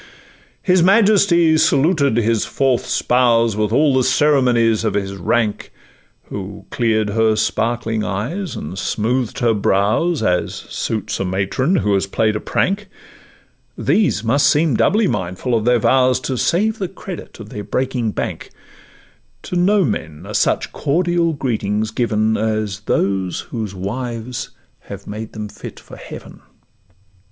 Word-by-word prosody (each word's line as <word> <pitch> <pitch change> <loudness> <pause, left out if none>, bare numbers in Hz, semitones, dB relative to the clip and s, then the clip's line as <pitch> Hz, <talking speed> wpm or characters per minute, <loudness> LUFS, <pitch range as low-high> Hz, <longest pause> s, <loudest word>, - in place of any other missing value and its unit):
His 185 -1 +3
majesty 190 -4 +4
saluted 140 -4 +3
his 115 -1 +1
fourth 135 -3 0
spouse 115 -3 +2
With 105 0 0
all 145 +3 +3
the 130 -1 +3
ceremonies 125 -7 +3
of - - -1
his 100 -1 -2
rank, 105 +4 -1 0.6
Who 100 0 -7
clear'd 110 -3 +1
her 110 0 +2
sparkling 115 0 -1
eyes 135 - -3
and 90 +6 -6
smooth'd 120 +2 -1
her 115 -2 +3
brows, 110 - +1
As 90 -4 0
suits 110 -2 -4
a - - 0
matron 100 - 0
who 105 - +1
has 95 0 +1
play'd 110 +2 0
a - - -1
prank; 200 - -1 0.9
These 200 - +1
must 140 +6 +3
seem 150 -1 +2
doubly 215 - +3
mindful 95 - -2
of 110 -1 +1
their 120 0 +4
vows, 130 +2 +3
To 130 +1 -3
save 210 - +1
the 190 - -1
credit 185 -5 -9
of 110 -2 -9
their 105 - -6
breaking 125 +2 -1
bank: - - -4 0.9
To - - -5
no 190 +3 +3
men 80 - -4
are 105 - -8
such 105 - +1
cordial 170 +2 +1
greetings 110 -6 -2
given 110 -2 0
As 110 -2 -1
those 95 -2 0
whose 110 -5 -6
wives 115 +5 -4 0.3
have 100 0 -10
made 110 +1 -7
them 105 -1 -5
fit - - -10
for - - -13
heaven. - - -11
115 Hz, 145 wpm, -19 LUFS, 105-145 Hz, 0.9 s, majesty